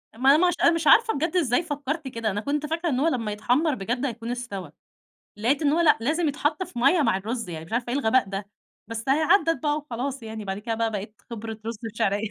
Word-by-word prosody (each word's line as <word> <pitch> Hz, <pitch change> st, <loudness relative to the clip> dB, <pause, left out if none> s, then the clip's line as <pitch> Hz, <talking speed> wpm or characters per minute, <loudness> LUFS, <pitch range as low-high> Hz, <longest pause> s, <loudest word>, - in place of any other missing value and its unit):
ما 270 Hz, +5 st, +5 dB
ما 355 Hz, +1 st, +4 dB
ش -, -, -2 dB
أنا 340 Hz, -, +7 dB
مش 330 Hz, -2 st, -1 dB
عارفة 450 Hz, 0 st, +6 dB
بجد 325 Hz, +6 st, -2 dB
إزاي 285 Hz, -1 st, +2 dB
فكّرت 290 Hz, -1 st, -4 dB
كده، 230 Hz, -4 st, -2 dB
أنا 205 Hz, +2 st, -2 dB
كنت 295 Hz, +4 st, -1 dB
فاكرة 330 Hz, +2 st, -1 dB
إن 255 Hz, -2 st, 0 dB
هو 315 Hz, -, +2 dB
لمّا 230 Hz, -8 st, -1 dB
يتحمّر 255 Hz, +8 st, +1 dB
بجد 240 Hz, +6 st, -2 dB
هيكون 235 Hz, -2 st, -4 dB
استوى، 200 Hz, -10 st, -5 dB, 0.7 s
لقيت 255 Hz, +8 st, +1 dB
إن 285 Hz, -, +3 dB
هو 330 Hz, -, +2 dB
لأ 325 Hz, -3 st, +5 dB
لازم 310 Hz, +7 st, +1 dB
يتحط 295 Hz, +4 st, -1 dB
في 245 Hz, -, -7 dB
مَيّة 320 Hz, +6 st, +4 dB
مع 190 Hz, -, +2 dB
الرز، 225 Hz, +1 st, -4 dB
يعني 160 Hz, -2 st, -6 dB
مش 165 Hz, -, -15 dB
عارفة 240 Hz, +1 st, -1 dB
إيه 280 Hz, -, +1 dB
الغباء 235 Hz, -4 st, +2 dB
ده، 195 Hz, 0 st, -4 dB, 0.4 s
بس 230 Hz, +2 st, -5 dB
أهي 285 Hz, +4 st, +3 dB
عدّت 330 Hz, -1 st, +3 dB
بقى 295 Hz, 0 st, +1 dB
وخلاص، 270 Hz, -2 st, -4 dB
يعني 220 Hz, -1 st, -6 dB
بعد 195 Hz, 0 st, -3 dB
كده 225 Hz, +2 st, -3 dB
بقى 225 Hz, 0 st, 0 dB
بقيت 210 Hz, 0 st, -6 dB
خِبرة 225 Hz, -1 st, -6 dB
رز 230 Hz, -2 st, -4 dB
بشعرية. 205 Hz, 0 st, 0 dB
245 Hz, 240 wpm, -25 LUFS, 220-300 Hz, 0.7 s, أنا